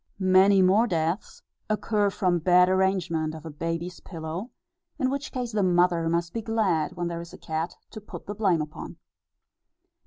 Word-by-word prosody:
Many 190 +1 +5
more 205 +6 +4
deaths 170 +1 -2 0.3
occur 210 -1 +1
from 185 -3 +1
bad 180 +2 +5
arrangement 180 -4 +1
of 160 0 -10
a 160 - -6
baby's 165 +3 -4
pillow, 165 +5 -6 0.5
in 260 -3 0
which 280 +1 -4
case 250 -2 -3
the 210 -2 0
mother 175 -2 +3
must 170 0 -1
be 230 - -2
glad 205 -8 0
when 175 -1 -3
there 170 0 -4
is 170 - -11
a - - -9
cat 160 +2 -4 0.2
to 215 - -8
put 210 - -10
the 205 - -5
blame 190 -7 +1
upon. 150 - -9
180 Hz, 175 wpm, -26 LUFS, 165-205 Hz, 0.5 s, Many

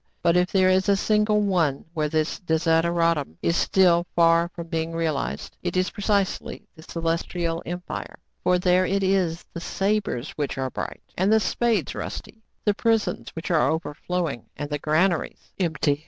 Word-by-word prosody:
But, 170 0 +4
if 180 0 +2
there 185 -1 +4
is 190 +1 +3
a 200 - +5
single 210 +1 +2
one 170 -9 +1
where 155 -3 0
this 155 0 -1
desideratum 165 - +1
is 170 - +2
still 175 -1 +3
far 170 0 +4
from 170 - -6
being 165 0 -3
realized, 160 -4 -2
it 175 0 -2
is 185 0 +1
precisely 200 -2 -1
the 160 - -13
Celestial 165 +1 -2
Empire: 175 +1 -6 0.3
for 180 - +3
there 180 0 +3
it 195 +1 0
is 185 -3 +1
the 170 - -6
sabres 195 - -1
which 145 -2 -3
are 130 -1 -2
bright, - - -6
and 190 +3 +2
the 220 - +6
spades 230 +2 0
rusty; 220 - -7 0.2
the 210 - +4
prisons 225 +1 0
which 165 +2 -4
are 155 -6 +3
overflowing, 160 -3 -3
and 145 0 -5
the 150 - -1
granaries 165 +4 0
empty. 155 -5 +1
170 Hz, 165 wpm, -24 LUFS, 160-190 Hz, 0.3 s, the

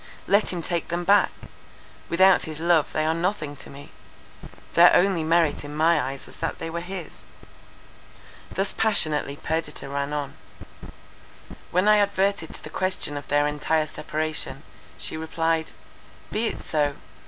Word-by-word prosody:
Let 200 +2 +3
him 175 -2 -4
take 170 -1 -2
them 175 +1 -2
back; 200 +3 +5 0.8
without 190 +2 +5
his 155 -1 -6
love 165 -2 +3
they 155 - 0
are 160 - +2
nothing 165 -4 -2
to - - -11
me. 140 +1 -12 0.8
Their 175 +1 +8
only 180 -3 +3
merit 165 -2 +2
in 145 0 -7
my 165 +2 +3
eyes 135 +1 -4
was - - -12
that 165 - -3
they 165 - -5
were 170 +1 -3
his." 180 -1 -7 1.3
Thus 195 +2 -2
passionately 155 -10 +1
Perdita 160 +1 -3
ran 140 +1 -3
on. 145 -2 -3 1.4
When 180 +4 +2
I 210 0 +7
adverted 200 -4 +1
to - - -8
the - - -9
question 185 -5 -2
of 145 - -6
their 145 0 +2
entire 150 +1 0
separation, 155 -2 -4 0.3
she - - -2
replied: 160 0 -1 0.6
"Be 225 +2 0
it - - -4
so! 145 -2 0
160 Hz, 155 wpm, -25 LUFS, 150-180 Hz, 1.4 s, Their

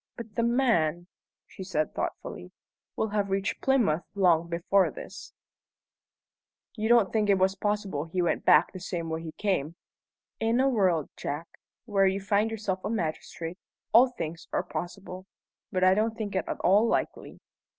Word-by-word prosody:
"But 225 -3 -8
the 230 - 0
man," 230 - +2 0.4
she 190 - -10
said 155 -5 -1
thoughtfully, 90 - -5 0.4
"will 220 - -1
have 205 -1 -1
reached 195 0 -1
Plymouth 225 - +2
long 170 -4 +3
before 175 +3 +2
this." - - -10 1.4
"You 220 -1 -2
don't 235 -6 +4
think 215 -2 +1
it 200 - +5 0.2
possible 205 -8 -1
he 165 +3 -4
went 175 -1 +1
back - - +5
the 185 - -7
same 170 -3 -4
way 160 0 -2
he 165 -1 -7
came?" 175 -6 -1 0.6
"In 225 +2 +1
a 265 - +4
world, 185 - +1
Jack, 150 +4 -4 0.4
where 200 -4 +3
you 190 +1 0
find 205 +2 +1
yourself 205 -4 -3
a 205 - -2
magistrate, 170 -2 -4 0.3
all 240 +4 +8
things 165 -9 -6
are - - 0
possible. 180 +4 -7 0.4
But 185 -2 0
I 185 0 +6
don't 220 +2 0
think 205 -3 -4
it 190 - 0
at - - -4
all 205 +5 +4
likely." - - -2
195 Hz, 160 wpm, -28 LUFS, 170-220 Hz, 1.4 s, all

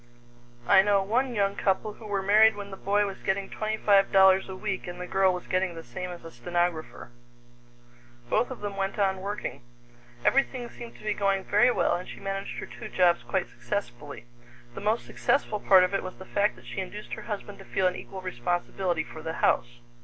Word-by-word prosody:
I - - +8
know 200 0 +3
one 240 +5 0
young 200 -1 +1
couple 200 +2 0
who 215 - -11
were 200 -2 -1
married 215 +2 +6
when 200 -1 -7
the - - -6
boy 205 +2 +1
was 195 -1 -6
getting 195 0 -1
twenty 215 0 -2
five 200 -2 +4
dollars 190 0 +5
a 190 - -5
week 195 -1 -3
and 175 0 -7
the 180 - -4
girl 190 +1 +3
was 180 -1 -5
getting 185 -1 0
the 165 - -8
same 120 +10 -6
as 175 -2 -9
a 165 - -8
stenographer. 160 -1 -2 1.2
Both 245 - +1
of 260 - -8
them 205 -1 -4
went 195 +1 -2
on 190 -2 +1
working. 205 -7 -4 0.6
Everything 255 -3 +1
seemed 235 -1 -10
to - - -15
be 210 -1 0
going 195 -1 +1
very 210 +6 +4
well, 245 - +2
and 180 +1 -6
she - - -9
managed 195 0 -4
her - - -5
two 215 - -9
jobs 175 -3 +3
quite 190 -2 -1
successfully. 145 -9 -5 0.5
The - - -7
most 215 +3 0
successful 220 -6 0
part 190 -2 +6
of 185 +2 0
it 195 - +1
was 185 0 -7
the 190 - -10
fact 205 -10 +1
that 120 0 -17
she 120 +9 -6
induced 205 +3 -7
her 220 - -5
husband 205 -1 -5
to - - -10
feel 190 - 0
an 180 0 +2
equal 190 -1 -8
responsibility 175 +2 -1
for 155 - -10
the 160 0 -4
house. 120 -6 +1
195 Hz, 215 wpm, -27 LUFS, 180-205 Hz, 1.2 s, I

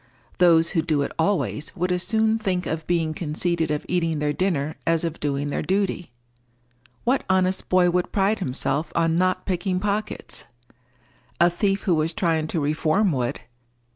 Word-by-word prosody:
Those 170 -2 +5
who 165 - +1
do 150 -3 0
it - - -4
always 165 -3 -1
would 180 0 -1
as 180 0 +1
soon 220 +2 +2
think 185 -4 -1
of 160 -1 -4
being 165 -3 +1
conceited 165 +1 -1
of 150 -1 -2
eating 165 -3 0
their 150 0 0
dinner 155 -4 -1
as 165 0 +2
of 165 -1 -3
doing 145 0 -2
their - - -1
duty. 190 -3 -1 0.9
What 255 +3 +1
honest 185 0 +1
boy 180 -1 +4
would 180 0 0
pride 200 +2 +1
himself 150 0 -2
on 165 0 +2
not 185 0 +1
picking 180 0 -1
pockets? 210 +2 -3 0.9
A 175 0 +5
thief 195 +2 0
who 185 - +2
was 160 +1 +1
trying 160 -3 +1
to 165 - -1
reform 155 +6 +1
would. 125 -4 -2
170 Hz, 170 wpm, -24 LUFS, 155-185 Hz, 0.9 s, Those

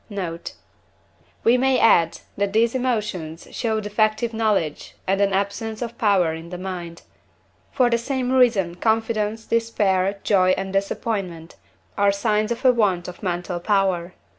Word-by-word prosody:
Note. 175 -5 -5 0.9
We 245 +2 +4
may 265 0 +3
add, 170 -7 +4
that 200 0 -1
these 225 +1 +3
emotions 210 -11 -2
show 220 -2 -1
defective 215 +2 0
knowledge 210 -9 -1
and 195 +1 +1
an 200 -1 +3
absence 200 +3 -2
of 235 0 -6
power 190 -7 +3
in 165 +1 -8
the 180 - -6
mind; 175 -2 -6 0.7
for 255 -3 +3
the 235 -1 +1
same 255 +1 -2
reason 230 -9 +3
confidence, 220 +1 -1
despair, 200 -4 +1
joy, 185 -3 +3
and 195 0 -4
disappointment 195 -4 -3 0.4
are 200 0 +4
signs 210 +2 0
of 235 +3 -4
a 255 - +8
want 195 -7 +1
of 180 - -9
mental 180 -2 -3
power. 185 -2 0
200 Hz, 145 wpm, -22 LUFS, 185-225 Hz, 0.9 s, a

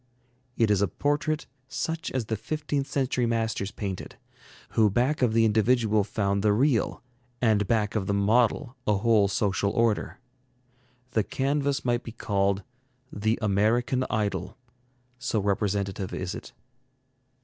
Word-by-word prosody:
It 115 -2 +3
is 100 -2 +3
a 100 - +3
portrait 145 - -1 0.2
such 160 +4 -3
as 130 -4 -2
the 110 - -2
fifteenth 145 +4 -3
century 130 -3 0
masters 110 -3 -1
painted, 100 -3 -5 0.5
who 110 -2 +3
back 125 +9 +1
of 120 -3 +3
the 115 0 +4
individual 110 -1 +3
found 100 -1 -1
the 105 0 +3
real, 120 0 +1 0.4
and 110 -4 +2
back 105 -3 +1
of 100 -3 -1
the 100 - +1
model 120 +5 +2
a 105 - +4
whole 105 -1 +4
social 100 0 0
order. 115 0 0 0.9
The 110 -2 +2
canvas 140 +2 -1
might 120 -1 +1
be 115 - -9
called 100 -2 0 0.5
'The 110 +2 0
American 115 +5 +2
Idol,' 100 -3 -2 0.6
so 125 -3 -1
representative 100 -1 -1
is 95 +1 -3
it. - - -8
110 Hz, 140 wpm, -27 LUFS, 100-125 Hz, 0.9 s, the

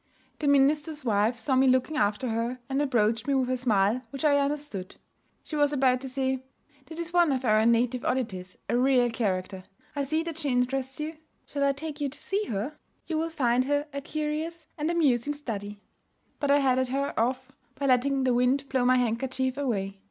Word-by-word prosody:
The 300 - -1
minister's 295 +2 +2
wife 220 +2 +2
saw 260 +4 0
me 265 +1 +4
looking 255 +4 +2
after 210 +1 0
her, 230 +3 -1
and 275 +1 0
approached 230 -4 +1
me 280 - +2
with 255 -1 +1
a - - +2
smile 225 -2 +2
which 275 +5 -4
I 285 -1 +5
understood. 280 -9 -3 0.5
She 310 - -6
was 290 -1 +3
about 260 -3 +2
to 265 - -6
say, 265 0 -1 0.5
'That 320 - -9
is 340 0 -4
one 345 -3 +4
of 260 -1 -1
our 215 -1 +4
native 235 +1 +2
oddities, 185 -8 -2
a - - 0
real 250 -1 +3
character. 190 -4 -2 0.3
I 285 - -1
see 315 +4 0
that 330 -1 -5
she 295 -3 -1
interests 260 +2 -1
you. 310 +1 -4 0.3
Shall 285 -1 -2
I 280 0 +3
take 300 +1 -7
you 285 - 0
to 280 - -9
see 405 +6 -2
her? 230 +8 -4 0.3
You 320 -2 -1
will 325 +1 -1
find 255 -5 +1
her 290 +1 +1
a 280 - -3
curious 310 +3 -3
and 300 +1 -2
amusing 290 -5 +2
study.' 210 -7 -6 0.6
But 285 - -1
I 285 - +6
headed 260 -1 +2
her 275 +2 -1
off 255 +3 -1 0.2
by 280 - -3
letting 270 +1 +2
the 255 -1 +2
wind 255 +3 +2
blow 260 -2 +1
my 255 +1 +4
handkerchief 255 +2 -1
away. 200 -8 -2
265 Hz, 200 wpm, -27 LUFS, 240-290 Hz, 0.6 s, I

